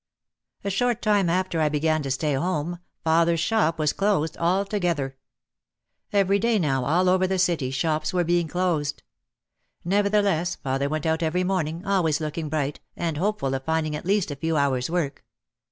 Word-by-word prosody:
A 200 - -1
short 240 +4 +1
time 205 -5 +3
after 180 -2 0
I 155 - +3
began 155 +1 +1
to 140 - -4
stay 145 +3 0
home 170 +3 -1 0.2
father's 165 +1 +3
shop 165 -3 +1
was 155 -1 +1
closed 195 -6 0
altogether. 175 -6 0 1.0
Every 200 0 +3
day 230 +1 +2
now 135 -8 0
all 175 +6 +2
over 185 +1 +3
the 190 0 0
city 170 -7 +1
shops 155 +4 -1
were 180 -2 +1
being 175 0 +1
closed. 165 -4 -1 0.8
Nevertheless 200 -2 +2
father 135 +1 -2
went 155 0 -2
out 160 +1 +1
every 170 +3 0
morning, 175 -2 -2
always 180 -7 +1
looking 155 0 -4
bright, 145 -2 -2 0.2
and 165 -3 -2
hopeful 175 -7 -1
of 135 0 -3
finding 160 0 -1
at 150 - -6
least 200 -5 +1
a - - -4
few 160 +3 -1
hours' 135 -2 +1
work. 165 -5 -2
165 Hz, 170 wpm, -25 LUFS, 150-185 Hz, 1.0 s, time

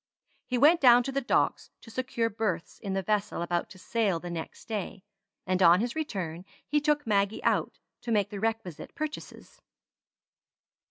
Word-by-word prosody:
He 250 - 0
went 310 +7 +5
down 245 -2 +7
to 270 - -3
the 275 +1 -1
Docks 250 - +1
to 230 - -13
secure 240 -1 -1
berths 205 -6 -3
in 195 - -4
the 195 0 -1
vessel 205 -3 -1
about 175 0 -1
to 190 - -13
sail 200 -2 0
the 175 +1 -7
next 165 -2 -7
day, 200 -3 -4 0.4
and 185 0 0
on 175 0 +7
his 240 +5 -2
return 185 - -4 0.2
he 295 0 +1
took 295 0 +1
Maggie 200 -1 +1
out - - +1 0.2
to 235 - -4
make 205 -1 +1
the 205 - -5
requisite 220 -6 -3
purchases. 310 +10 -7
215 Hz, 170 wpm, -28 LUFS, 185-250 Hz, 0.4 s, down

